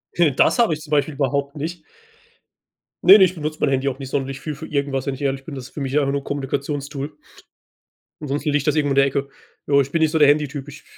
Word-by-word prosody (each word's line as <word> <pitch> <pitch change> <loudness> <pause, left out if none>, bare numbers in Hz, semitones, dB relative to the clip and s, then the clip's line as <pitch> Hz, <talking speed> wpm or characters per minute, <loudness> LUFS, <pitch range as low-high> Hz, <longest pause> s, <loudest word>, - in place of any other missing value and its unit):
Heh, 170 -4 +4
das 130 - +2
habe 230 -9 +4
ich 155 - -5
zum 150 - -12
Beispiel 145 0 +1
überhaupt 140 +1 -1
nicht. 160 +3 -5 1.2
Ne, 195 +3 +10
ne, 190 - +7
ich 185 0 -3
benutze 155 -1 -4
mein - - +2
Handy 135 0 +1
auch 135 0 -7
nicht 135 -1 -7
sonderlich 135 -1 -2
viel 150 +1 -5
für 160 - -8
irgendwas, 140 -3 -2
wenn 140 - -1
ich 135 - -9
ehrlich 135 -1 -1
bin. 150 - -8
Das 130 -2 -7
ist 130 - -14
für 150 - -6
mich 135 +2 0
einfach 140 -1 0
nur 140 - -1
'n - - -19
Kommunikations-Tool. 140 +1 -4 1.1
Ansonsten 145 +1 -2
liegt 145 0 0
das 150 - +2
irgendwo 145 -2 +1
in - - -2
der 140 0 +5
Ecke. 140 0 -2 0.4
Jo, 140 -1 +4
ich 140 0 -4
bin 165 - 0
nicht 155 -1 +3
so 160 - +1
der 150 - +7
Handy-Typ. 145 -1 +1
Ich 145 +1 -11
145 Hz, 255 wpm, -21 LUFS, 135-150 Hz, 1.2 s, Ne